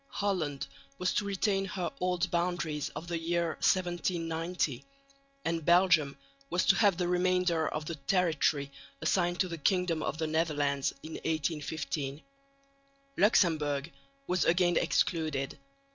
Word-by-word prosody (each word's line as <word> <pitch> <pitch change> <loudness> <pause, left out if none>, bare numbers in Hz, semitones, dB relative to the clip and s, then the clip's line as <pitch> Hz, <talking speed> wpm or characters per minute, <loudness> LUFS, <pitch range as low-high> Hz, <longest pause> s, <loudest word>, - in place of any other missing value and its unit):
Holland 175 - -2 0.3
was 180 0 0
to 205 - 0
retain 195 0 0
her 185 -3 -3
old 180 0 0
boundaries 170 -4 -1
of 170 - -6
the 170 -1 -2
year 170 0 0
1790, 170 -5 0 0.6
and 165 -1 -1
Belgium 170 -5 +4 0.3
to 185 +2 +3
have 200 -5 +4
the 180 -1 0
remainder 180 -2 +2
of 155 0 -3
the 170 - -4
territory 155 -3 +1 0.3
assigned 175 -1 +1
to 185 - +1
the 170 -2 -6
kingdom 180 0 +1
of 150 - -2
the 160 - -1
Netherlands 145 -3 0
in 155 - -8
1815. 150 -2 -3 0.9
Luxemburg 155 -7 +2 0.3
was 180 +3 +1
again 175 0 +3
excluded. 155 -7 0
170 Hz, 125 wpm, -30 LUFS, 155-180 Hz, 0.9 s, Belgium